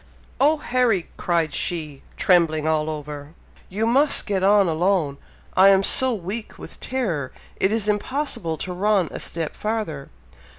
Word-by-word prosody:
"Oh, 300 +3 +4
Harry!" 245 - 0
cried 165 -4 0
she, 155 -5 -3 0.2
trembling 165 -4 +3
all 155 -1 +1
over, 150 0 -7 0.3
"you 210 +4 -1
must 275 +6 +3
get 195 -3 -1
on 200 0 +5
alone! 165 -4 0 0.4
I 190 +1 +7
am 195 0 +4
so 260 +5 +4
weak 210 +1 -5
with - - -11
terror, 185 - -2 0.3
it 190 - +1
is 220 -2 0
impossible 210 - -2
to 180 +4 -5
run 195 -2 +1
a - - -6
step 165 -2 -4
farther." 210 -10 -4
185 Hz, 145 wpm, -22 LUFS, 160-220 Hz, 0.4 s, I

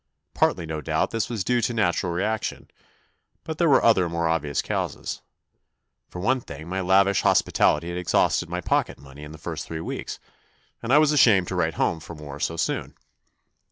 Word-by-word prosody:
Partly 90 -3 +1
no 80 -1 -4
doubt 80 0 -1
this 115 0 -2
was 115 -5 -2
due 120 +4 +1
to 120 - -1
a - - -7
natural 90 -4 +1
reaction, 105 +5 -3 0.7
but 160 -1 -6
there 170 - +3
were 135 - +5
other 95 -7 +4
more 85 0 -1
obvious 75 -3 -1
causes. - - -3 0.9
For 90 - -8
one 130 +7 +1
thing 80 -7 -10
my 95 +2 -2
lavish 95 +1 +3
hospitality 85 +3 +2
had 85 - -4
exhausted 85 -1 +1
my 90 +1 -3
pocket - - 0
money 70 +1 -14
in 75 - -9
the 80 - -10
first - - -6
three 80 - -5
weeks, 80 - -5 0.6
and 115 - -3
I 145 - +7
was 150 -1 +5
ashamed 105 -11 +4
to 95 - -3
write 80 -2 0
home 85 - 0
for 85 +1 -10
more 75 -2 -9
so 80 - -2
soon. - - -2
90 Hz, 190 wpm, -24 LUFS, 80-110 Hz, 0.9 s, I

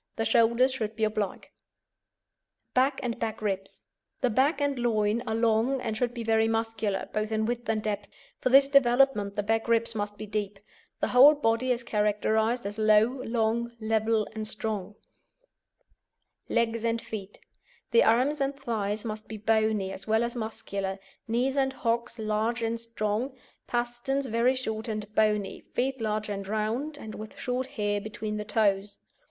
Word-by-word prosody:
The 225 - -1
shoulders 235 +3 +4
should 220 -4 -3
be 220 - -2
oblique. 215 -2 -2 1.2
BACK 265 +2 +2
AND 235 -2 -3
BACK 225 -2 -3
RIBS 195 -2 -4 0.4
The 250 - +2
back 270 +9 +2
and 285 -3 0
loin 220 -1 +1
are 220 - 0
long, 230 +3 +2
and 225 -3 -3
should 240 +1 0
be 235 - -4
very 225 0 +3
muscular, 225 -3 -1
both 215 +1 -1
in 220 0 +1
width 240 0 -3
and 215 -1 0
depth; 205 -1 -2 0.3
for - - +1
this 275 +2 +7
development 250 -6 +3
the 205 - -1
back 225 +2 0
ribs 230 0 +2
must 205 -1 -3
be 215 - -6
deep. 205 -1 -3 0.4
The - - +1
whole 275 +5 +8
body 250 -2 +1
is 240 -1 0
characterised 220 +2 +1
as 205 +2 -4
low, 215 +4 +4
long, 235 0 0
level, 220 0 +1
and 215 -1 -4
strong. 210 -2 -3 1.5
LEGS 230 -1 +1
AND 230 0 +1
FEET 205 -3 -8 0.5
The 230 - +6
arms 260 +6 +3
and 275 +1 0
thighs 215 -4 -2
must 215 -1 -5
be 220 - -6
bony, 215 -2 +1
as 195 - -9
well 220 +1 +3
as 235 +1 -3
muscular, 200 -4 -4 0.3
knees 250 +4 0
and 265 -1 +2
hocks 235 -1 -1
large 220 +2 -1
and 230 +1 -1
strong, 230 +3 -2 0.3
pasterns 240 +3 -1
very 240 +2 +2
short 220 -3 -4
and 215 -1 -4
bony, 210 -2 +1 0.2
feet 265 0 0
large 215 -1 -1
and 200 -2 -4
round, 225 +8 -2
and 220 -6 -8
with 215 0 -9
short 250 +1 -2
hair 205 -6 -1
between 215 0 -4
the 210 - -4
toes. 205 -2 +1
225 Hz, 165 wpm, -28 LUFS, 215-240 Hz, 1.5 s, whole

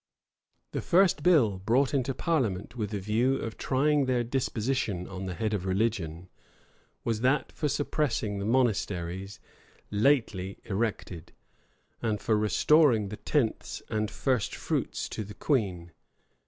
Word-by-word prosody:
[*] - - -50
The - - -2
first 180 -3 +3
bill 135 - +4
brought 120 +8 +2
into 135 -1 0
parliament 120 - -1
with 105 -4 -3
a 105 - -2
view 115 +7 +1
of 115 -4 -4
trying 145 +2 +2
their 125 -2 +2
disposition 120 -5 -1
on 95 0 -6
the 90 - -4
head 110 +1 -1
of 100 -4 -1
religion, 95 -4 -1 0.8
was 115 -2 -1
that 130 +4 +2
for 150 - -2
suppressing 140 -7 -1
the 100 - -3
monasteries 100 -6 0 0.5
lately 105 -5 +1
erected, 100 -5 -3 0.7
and 110 -3 0
for 110 - +1
restoring 110 +1 +4
the 105 - -6
tenths 130 -8 -1
and 110 -1 -1
first 125 -1 -1
fruits - - -2
to 110 - -4
the 105 +1 -10
queen. 95 - -1
110 Hz, 140 wpm, -28 LUFS, 100-135 Hz, 0.8 s, bill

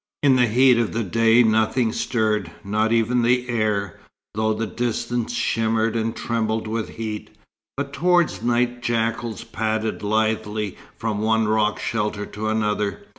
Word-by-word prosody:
In 135 -2 +5
the 125 -1 +4
heat 125 +2 +5
of 115 - -1
the 115 - -1
day 115 +4 +4
nothing 110 +1 +2
stirred, 110 -6 0
not 110 +3 0
even 115 +2 +2
the 125 +1 +2
air, 105 -5 -1 0.3
though 110 +1 0
the 110 +1 -1
distance 120 +2 -2
shimmered 115 0 0
and 115 0 -1
trembled 110 -2 -1
with 110 0 -3
heat; 110 -2 -5 0.5
but 140 0 -4
towards 175 0 +2
night 120 0 0
jackals 115 -2 -1
padded 110 -1 -2
lithely 110 -1 -1 0.2
from 110 -2 -2
one 110 0 +2
rock 105 0 +1
shelter 105 -2 -2
to 110 +1 -5
another. 105 -2 -1
110 Hz, 145 wpm, -22 LUFS, 110-120 Hz, 0.5 s, In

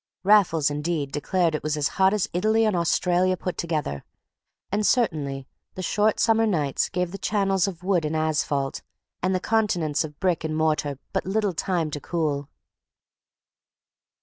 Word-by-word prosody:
Raffles, 185 -7 +4
indeed, 150 -1 -2
declared 165 +3 0
it 155 - -2
was 155 0 -2
as 145 -1 +1
hot 190 0 +3
as 210 -2 0
Italy 220 +5 +2
and 215 -3 +1
Australia 180 +2 +2
put 180 0 -4
together; 155 - -3 0.7
and 210 +2 0
certainly 150 - 0 0.3
the 185 - -5
short 210 +3 +1
summer 225 0 +3
nights 150 -9 0
gave 180 -1 -2
the 195 - -7
channels 195 -3 +1
of 180 -3 -6
wood 185 -3 +1
and 155 +1 -2
asphalt 150 -3 -1 0.4
and 185 +1 +1
the - - +1
continents 180 -8 +1
of 150 -2 -9
brick 180 -4 0
and 155 -1 -2
mortar 150 -3 0 0.2
but - - -1
little 205 -1 0
time 170 -2 -1
to 145 - -4
cool. 145 -4 -2
175 Hz, 160 wpm, -25 LUFS, 150-195 Hz, 0.7 s, Raffles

